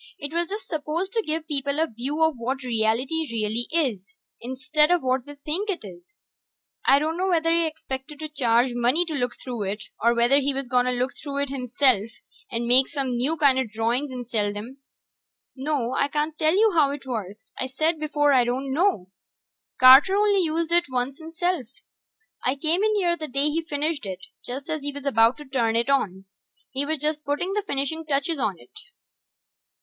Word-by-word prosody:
It 285 +2 -6
was 340 0 -1
just 415 +2 -6
supposed 320 +4 -3
to 455 - +1
give 315 -1 -3
people 280 -1 -2
a 320 - +3
view 280 +4 -2
of 320 0 +3
what 255 +3 -3
reality 250 +7 0
really 225 +1 -1
is, 270 - -2 0.2
instead 260 +5 +1
of 355 -3 +2
what 255 +1 0
they 290 - -9
think 310 +9 -3
it 355 - -3
is. 175 -3 -11 0.9
I 275 - +7
dunno 325 +6 -1
whether 330 -2 +2
he 335 -1 +2
expected 295 -2 -7
to 310 +1 -5
charge 245 -4 +2
money 245 +8 +2
to 325 - -5
look 245 -4 -1
through 245 -4 -5
it, 205 +2 -4 0.2
or 235 +1 +3
whether 240 +4 +4
he 280 0 0
was 275 0 -2
gonna 250 0 +2
look 250 +1 -1
through 280 -1 -2
it 285 - -4
himself 250 -4 +1 0.4
and 235 0 -1
make 255 +2 +6
some 270 -4 -2
new 275 +7 -1
kinda 270 -3 +4
drawings 230 +5 0
and 250 -2 -7
sell 205 -3 -1
'em. 245 +6 -8 0.8
No, 270 -3 -1
I 280 - +1
can't 300 +2 -2
tell 315 +2 +2
you 435 +2 +4
how 305 -4 +4
it 280 -1 -6
works 215 -5 -6
I 260 - -2
said 310 +5 -1
before 295 -1 +2
I 255 -2 +5
don't 260 +3 -2
know. 290 - +1 0.7
Carter 265 +9 +8
only 410 -1 +3
used 330 0 -1
it 345 0 +3
once 255 +3 -2
himself. 330 -3 -2 0.8
I 255 - +1
came 325 +7 +2
in 430 0 +2
here 350 -4 +1
the 310 -2 -6
day 280 +3 +1
he 325 +2 0
finished 295 -5 -1
it, 185 -1 -7 0.2
just 265 +3 -6
as 310 -2 -3
he 285 +1 -4
was 285 0 -8
ready 225 +2 +5
to 295 - -10
turn 235 -4 0
it 235 +4 +2
on. 195 -8 0 0.5
He 275 +2 -2
was 315 +1 +1
just 300 +1 -1
putting 295 +7 -2
the 420 - 0
finishing 320 -3 -2
touches 295 +1 -1
on 205 -7 -1
it. - - -19
280 Hz, 195 wpm, -24 LUFS, 245-315 Hz, 0.9 s, Carter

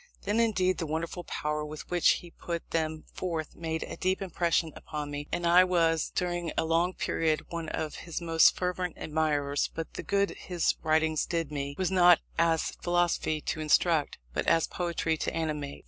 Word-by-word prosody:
Then, 205 +3 0
indeed, 190 -5 +2
the 165 - -2
wonderful 165 +3 -3
power 150 0 -2
with 150 0 -7
which 175 -1 +4
he 175 - -12
put 170 0 -6
them 160 -1 -1
forth 165 -4 -4
made 160 -1 -3
a - - -7
deep 185 0 0
impression 170 -4 0
upon 150 -1 -6
me, 145 0 -5
and 175 - -1
I 175 +2 +7
was 165 -3 +2
during 175 -2 -1
a 165 - +2
long 170 +3 +1
period 160 -1 0
one 165 -2 -4
of 155 -1 -3
his 170 -2 -5
most 165 -1 +5
fervent 180 -1 -2
admirers; 150 -2 0
but 165 0 -5
the - - -5
good 200 0 +1
his 175 -2 -1
writings 160 0 +2
did 165 -3 -2
me, 140 -1 -3
was 185 -1 0
not 175 -2 +6 0.2
as 165 -1 +2
philosophy 175 -3 +1
to 155 - -3
instruct, 155 0 +2 0.2
but - - -2
as 165 - +4
poetry 170 -2 -1
to - - -3
animate. 150 -3 -3
165 Hz, 180 wpm, -29 LUFS, 155-175 Hz, 0.2 s, I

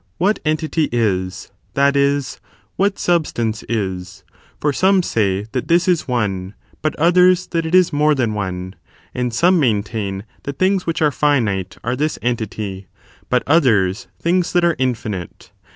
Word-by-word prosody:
^jj^t 205 +4 +2
entity 155 0 0
is, 95 -5 -1 0.2
that 140 +1 +3
is, 140 0 0 0.3
what 200 +1 +1
substance 120 -11 0
is: 95 -3 -3 0.4
for 150 - +1
acme 190 +5 +3
say 100 - 0
that 130 -2 -3
this 175 +2 +3
is 180 -3 +1
one, 100 -6 -2 0.3
but 155 - -1
others, 180 +2 +4
that 165 -2 -2
it 165 - +1
is 185 -4 +4
more 150 +1 +3
than 120 -5 0
one; 95 -2 -4 0.4
and 125 -1 -2
some 175 +10 +3
maintain 105 -5 -1 0.2
that 140 0 -6
things 190 -1 +1
which 165 -1 0
are 150 - +3
finite 110 -11 0
are 120 +2 -1
this 150 +4 -1
entity, 110 -5 -3 0.4
but 125 - +2
others, 115 - +2
things 175 +1 0
that 175 -1 +3
are 170 -2 +2
infinite. 110 -9 -3
130 Hz, 150 wpm, -19 LUFS, 105-165 Hz, 0.4 s, others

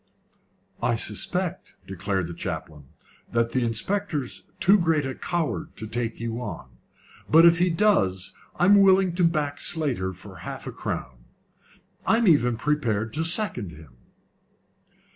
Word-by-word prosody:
"I 120 - +1
suspect," 175 - -3
declared 95 0 -2
the 85 - -7
chaplain, 80 -4 -6 0.5
"that 115 0 +1
the 130 0 0
inspector's 145 - -2 0.2
too 195 +3 +5
great 160 -4 +1
a 135 - -3
coward 170 +2 -3
to 110 - -6
take 115 +1 -3
you 115 0 -4
on, 110 -4 -7 0.6
but 165 +2 +7
if 170 0 +6
he 180 +1 +3
does 165 - +1 0.2
I'm 200 +3 +5
willing 190 -2 +4
to 180 +1 0
back 150 -4 0
Slater 140 - 0
for 95 +1 -12
half - - -7
a - - -5
crown. 60 -1 -6 0.8
I 225 - +4
am 230 -2 +2
even 125 -8 +4
prepared 115 -6 -1
to 160 - -1
second 165 - +2
him." 75 -4 -15
130 Hz, 145 wpm, -25 LUFS, -, 0.8 s, but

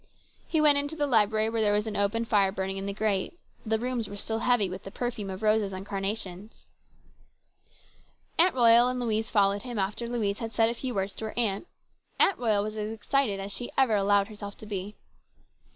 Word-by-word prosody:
He 320 - +1
went 295 -2 +6
into 285 +2 -1
the 295 -2 0
library 220 -4 +3
where 225 -1 0
there 205 -1 +3
was 210 +1 0
an 215 -1 -4
open 205 +3 0
fire 200 -3 +3
burning 190 0 -3
in 195 +1 -4
the - - -1
grate. 210 - -1 0.3
The 220 -1 0
rooms 240 -2 -2
were 200 - -7
still 220 +2 -3
heavy 240 -4 +2
with 185 +1 -7
the - - -9
perfume 235 -2 -4
of 190 +3 -6
roses 215 -2 +2
and 190 +1 -6
carnations. 195 0 -5 1.7
Aunt 350 -1 +5
Royal 235 -1 +6
and 250 0 -2
Louise 225 -2 -1
followed 200 -1 +3
him, 245 -2 -6
after 205 +4 -2
Louise 210 -4 -1
had 225 -1 -5
said 225 +1 +3
a - - -1
few 250 +1 -5
words 195 0 -1
to 220 - -6
her 220 - -7
aunt. 220 - 0 0.5
Aunt 395 - +3
Royal 215 -4 +2
was 215 +1 -5
as 210 0 -3
excited 225 -1 0
as 195 +1 -5
she 240 +4 -5
ever 260 -5 +4
allowed 200 0 +3
herself 205 -2 -9
to - - -11
be. 205 0 -5
215 Hz, 210 wpm, -28 LUFS, 200-235 Hz, 1.7 s, went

